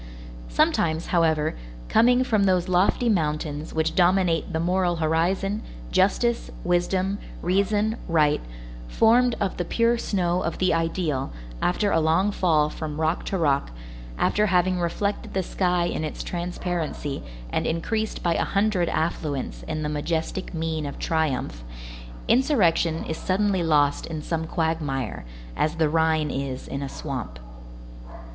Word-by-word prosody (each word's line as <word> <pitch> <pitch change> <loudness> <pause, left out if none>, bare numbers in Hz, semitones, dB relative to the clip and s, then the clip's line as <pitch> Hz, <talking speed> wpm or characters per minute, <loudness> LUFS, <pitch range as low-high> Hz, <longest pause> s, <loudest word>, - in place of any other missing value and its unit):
Sometimes, 160 - +1
however, 160 -2 +2 0.3
coming 245 - +4
from 215 -6 +2
those 185 -1 +2
lofty 185 +6 +2
mountains 155 -6 -1
which 160 0 0
dominate 180 -2 +2
the 160 - -1
moral 180 +1 +1
horizon, 175 +6 0 0.3
justice, 235 +5 +2
wisdom, 185 +3 0 0.2
reason, 205 +4 +1
right, 155 -4 +3 0.5
formed 235 - +4
of 195 -2 -1
the 175 - 0
pure 230 +6 +1
snow 180 -4 0
of 165 - -2
the 185 -2 +2
ideal, 165 -4 -1 0.3
after 200 +3 +1
a 165 - +3
long 165 +6 +2
fall 160 -6 +2
from 155 0 -5
rock 160 +2 0
to 195 - -1
rock, 140 - +1 0.5
after 210 - +2
having 180 -1 +2
reflected 195 +5 -2
the 190 - +1
sky 180 -1 0
in 165 - -2
its 155 - -4
transparency 175 -4 -3 0.3
and - - 0
increased 215 +7 -2
by 170 - +2
a - - +1
hundred 200 -3 +1
affluents 150 -4 -2
in 155 -1 -3
the - - -1
majestic 160 +4 -2
mien 160 -2 -2
of 140 - -7
triumph, 145 - -1 0.6
insurrection 185 - +3
is 160 - -3
suddenly 195 0 +1
lost 145 -3 +2
in 155 -2 -5
some 160 0 -2
quagmire, 150 - -2 0.3
as 155 +1 0
the 160 -2 +2
Rhine 160 -1 +2
is 135 -1 -4
in 140 - -4
a 140 - -4
swamp. 130 - -5
170 Hz, 140 wpm, -25 LUFS, 155-190 Hz, 0.6 s, coming